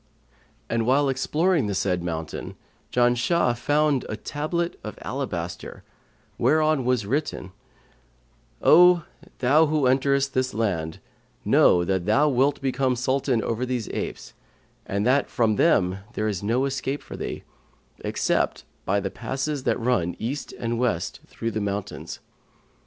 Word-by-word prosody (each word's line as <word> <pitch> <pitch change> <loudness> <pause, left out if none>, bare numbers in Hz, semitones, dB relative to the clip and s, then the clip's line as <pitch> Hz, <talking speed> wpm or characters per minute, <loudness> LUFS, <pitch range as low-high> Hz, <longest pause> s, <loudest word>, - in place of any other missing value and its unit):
And 115 0 -1
while 140 +2 +3
exploring 150 - +1
the 100 - -2
said 90 -2 0
mountain 80 -2 -5 0.4
Janshah 120 +3 +2
found 145 +2 +1
a 110 - -3
tablet 170 +6 -3
of 105 - -7
alabaster, 90 -11 -5 0.6
whereon 155 -3 +3
was 125 -4 +1
written, 130 -6 -2 1.1
'O 175 0 +7 0.3
thou 150 +5 +4
who 150 -1 0
enterest 135 +1 +2
this 130 -3 0
land, 85 -8 -1 0.5
know 90 - +5
that 95 0 -1
thou 140 +8 +4
wilt 135 +2 +2
become 130 -1 +1
Sultan 130 -1 0
over 115 +2 -2
these 125 -3 -2
apes - - -5 0.5
and 100 +1 -1
that 135 +3 +2
from 110 -3 +1
them 95 0 +3
there 110 - -1
is 100 -4 -2
no 120 +6 +1
escape 135 +1 -3
for - - -9
thee, - - -5 0.6
except - - 0 0.2
by 100 +2 +2
the 95 -1 -3
passes 135 +1 -3
that 120 - +1
run 115 -8 0
east 130 +7 -4
and 115 0 -3
west 115 -9 -1
through 115 - -4
the 110 - -2
mountains. 100 0 -4
125 Hz, 135 wpm, -25 LUFS, 105-140 Hz, 1.1 s, O